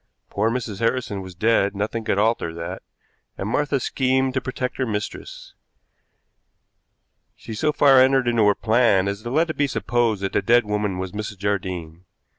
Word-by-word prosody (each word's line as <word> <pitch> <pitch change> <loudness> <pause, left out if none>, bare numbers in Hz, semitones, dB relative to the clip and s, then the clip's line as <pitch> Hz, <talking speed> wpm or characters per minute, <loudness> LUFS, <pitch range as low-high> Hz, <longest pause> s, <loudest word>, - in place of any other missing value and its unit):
Poor 110 +3 +1
Mrs. 115 -4 -4
Harrison 115 -4 -1
was 95 -1 -10
dead, 100 0 +2
nothing 110 +3 -3
could 100 - 0
alter 110 -5 +1
that, 85 +3 -6 0.6
and 95 - -4
Martha 140 +4 0
schemed 130 +1 0
to 130 - -1
protect 130 0 -4
her 130 - 0
mistress. 105 -1 -6 1.8
She 115 - -9
so 150 +8 0
far 140 -3 +5
entered 130 -1 +3
into 115 -3 +3
her 100 - +4
plan 110 -4 +2
as 100 +1 -3
to 120 - -6
let 160 +5 +1
it - - -11
be 145 - +2
supposed 120 -6 0
that 95 - -2
the - - +2
dead 120 0 +3
woman 105 -2 -2
was 95 0 -4
Mrs. 105 -1 -6
Jardine. 90 -4 -4
110 Hz, 175 wpm, -22 LUFS, 100-125 Hz, 1.8 s, far